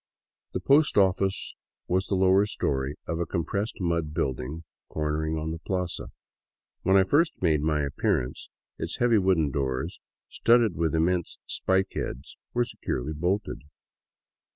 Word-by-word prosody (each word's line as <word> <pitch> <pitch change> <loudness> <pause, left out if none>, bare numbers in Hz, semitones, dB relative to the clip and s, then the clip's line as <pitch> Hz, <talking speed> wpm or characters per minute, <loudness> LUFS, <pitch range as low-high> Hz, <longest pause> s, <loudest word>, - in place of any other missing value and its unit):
The - - -1
post 145 -1 +4
office 95 0 +2 0.3
was 95 +2 +1
the 100 - 0
lower 95 +2 +4
story 65 -6 -1
of 85 - -3
a 85 - -1
compressed 100 +6 -2
mud 85 -4 -1
building 70 +4 -2 0.3
cornering 80 +1 -1
on 80 +1 -3
the 80 - -5
plaza. 90 0 -3 0.7
When 95 +1 +4
I 95 - +6
first 150 - +2
made 80 -5 +2
my 75 -1 +1
appearance, 70 -3 -1 0.3
its - - -4
heavy 120 -3 +4
wooden 90 -6 +2
doors, 65 -2 -2 0.3
studded 115 -4 +3
with 80 0 0
im 80 - +3
r - - +4
mense 90 -1 -1
spike 95 0 0
heads, 65 +4 -5 0.2
were 120 0 +1
securely 75 - -4
bolted. 90 -2 -1
85 Hz, 150 wpm, -27 LUFS, 75-95 Hz, 0.7 s, I